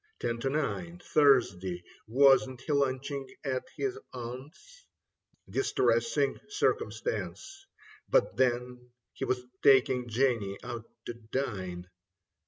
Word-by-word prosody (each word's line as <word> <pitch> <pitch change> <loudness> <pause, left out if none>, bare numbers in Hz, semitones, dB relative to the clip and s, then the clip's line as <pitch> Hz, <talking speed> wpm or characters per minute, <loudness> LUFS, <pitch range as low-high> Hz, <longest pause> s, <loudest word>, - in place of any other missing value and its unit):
Ten 115 0 -2
to 135 - -1
nine. 155 +4 -2
Thursday. 95 - +3 0.2
Wasn't 130 +1 +4
he 150 - -2
lunching 140 0 -1
at 130 -3 -2
his 405 0 -2
aunt's? 135 - -9 0.6
Distressing 465 - +1
circumstance. 415 -2 -2 0.4
But - - +3
then 125 -1 0 0.2
he - - -3
was 125 -1 -1 0.2
taking 130 -2 +4
Jenny 115 -5 +1
out 120 -2 -6 0.2
to - - -4
dine. 105 -7 -4
130 Hz, 100 wpm, -30 LUFS, 120-145 Hz, 0.6 s, Wasn't